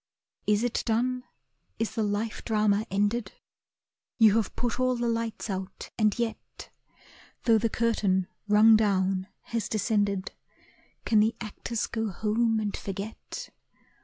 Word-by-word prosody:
Is 210 +1 +3
it 245 - 0
done? 250 +3 0 0.5
is 225 - -2
the 225 - -1
life 210 +1 -2
drama 215 -1 +2
ended? 205 +2 0 0.8
You 220 -3 +6
have 225 - -1
put 240 0 -2
all 255 0 +2
the 240 0 -1
lights 230 -1 -2
out, 190 -2 -5
and 215 -2 +2
yet, 235 -2 -5 0.7
Though 225 -2 +5
the 230 +1 +1
curtain, 210 -5 +1 0.2
rung 215 +2 +7
down, 190 -3 +1
has 230 -2 -3
descended, 205 -2 0 0.7
Can 220 - +4
the 220 +2 +3
actors 220 +1 -3
go 225 -1 -2
home 220 +3 +1
and 210 -2 -2
forget? 205 - -6
220 Hz, 135 wpm, -28 LUFS, 205-230 Hz, 0.8 s, rung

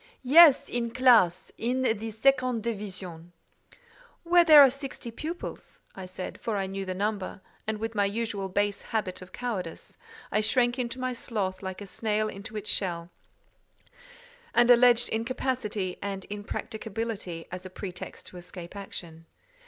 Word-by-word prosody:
"Yes, 295 +2 +8
in 235 -1 -2
classe: 230 -8 +4
in 250 +3 0
the 225 -2 0
second 255 0 +2
division." 185 -6 -6 0.9
"Where 345 0 +6
there 310 -3 +10
are 270 - +6
sixty 275 -3 -7
pupils," 320 +9 -7 0.3
said 185 0 -7
I; - - -27
for 220 -3 -2
I 195 - 0
knew 195 0 -4
the 185 0 -3
number, 200 -1 -2 0.3
and 220 0 -1
with 225 +1 -4
my 205 -2 +2
usual 200 -2 -2
base 205 +1 0
habit 200 -5 -3
of 185 - -11
cowardice, 205 -9 -5 0.3
I 215 - +2
shrank 240 +3 +2
into 250 +1 -3
my 255 0 -1
sloth 205 -6 -3
like 190 0 -6
a - - -6
snail 215 +2 -1
into 210 +2 -7
its 210 0 -2
shell, 175 -3 -2 1.4
and 240 +1 +6
alleged 245 0 +6
incapacity 225 -5 -2
and 195 -1 -4
impracticability 210 -3 -5
as 185 +1 -6
a - - -11
pretext 185 -1 -8
to 180 - -12
escape 175 +1 -9
action. 165 -4 -8
215 Hz, 150 wpm, -28 LUFS, 190-240 Hz, 1.4 s, there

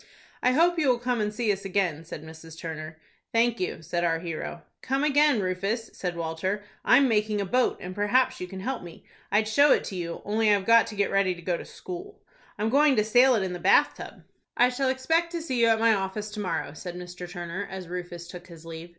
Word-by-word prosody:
"I 250 - +3
hope 340 +4 +3
you 300 - +2
will 250 - +3
come 245 -1 -1
and 210 0 -1
see 220 0 0
us 195 0 -7
again," 185 -5 -1
said 155 -2 -8
Mrs. 160 0 -12
Turner. 155 -1 -6 0.3
"Thank 235 0 +2
you," 180 -3 -3
said 175 +2 -2
our 165 -1 +2
hero. 165 0 -6 0.2
"Come 270 +2 -1
again, 295 -3 +4
Rufus," 195 +5 -2
said 180 -2 -4
Walter; 170 +5 -3 0.2
"I'm 265 +2 +5
making 210 -2 +1
a 200 - -1
boat, 250 +6 +1
and 180 +1 -7
perhaps 250 +6 +1
you 180 - -4
can 190 +1 -8
help 260 +4 -3
me. 175 -1 -12 0.3
I'd 210 +1 +3
show 285 +6 +5
it - - +4
to 195 - -6
you, 170 -2 -5
only 215 +1 +2
I've 200 -2 +2
got 230 +1 +6
to 215 - -7
get 200 0 0
ready 195 -2 +2
to 175 - -12
go 175 0 0
to - - -7
school. 370 +3 -9 0.4
I'm 215 +1 0
going 285 +2 +4
to 210 - +3
sail 245 +4 +5
it 205 - +1
in 185 -1 -3
the 175 - -5
bath - - +4
tub." - - -10 0.3
"I 245 +1 +5
shall 260 +1 0
expect 325 +6 +1
to 340 - -2
see 255 -6 -1
you 230 - +5
at 225 -1 +3
my 225 0 +5
office, 205 +1 -3
to 210 - -7
morrow," 180 -7 -2
said 175 +2 -7
Mr. 180 0 -8
Turner, 175 +2 -5
as 190 -2 -7
Rufus 175 -1 -6
took 180 0 -10
his 165 -2 -13
leave. 165 +1 -8
205 Hz, 235 wpm, -26 LUFS, 175-245 Hz, 0.4 s, got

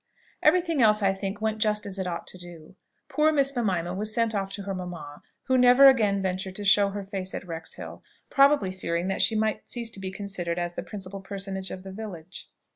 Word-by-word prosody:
Every 365 - +5
thing 330 -5 -1
else, 215 -2 +4
I 195 0 +3
think, 195 +1 -5
went 220 0 -1
just 210 -1 +1
as 195 -1 -5
it 190 - -2
ought 170 -1 -4
to - - -6
do. 175 0 -12 0.3
Poor 310 +1 +3
Miss 275 -2 +2
Mimima 180 -7 0
was 210 +3 -2
sent 230 0 +1
off 195 -1 -2
to 200 - -5
her 195 0 -3
mamma, 175 -6 -7 0.2
who 260 -1 +2
never 250 +2 +8
again 205 -6 +2
ventured 190 0 -3
to 205 - -6
show 200 0 +5
her 200 0 -5
face 190 -1 -5
at - - -6
Wrexhill; 165 -2 -7 0.3
probably 275 -8 +4
fearing 175 -1 -2
that 195 - 0
she 225 - +3
might 215 0 -1
cease 235 -2 -3
to 195 - -8
be 190 -1 -4
considered 185 -3 -4
as 175 0 -2
the - - -4
principal 195 -1 -7
person 195 0 -5
of 190 -1 -6
the 190 - -8
village. 190 -4 -8
195 Hz, 220 wpm, -26 LUFS, 185-220 Hz, 0.3 s, never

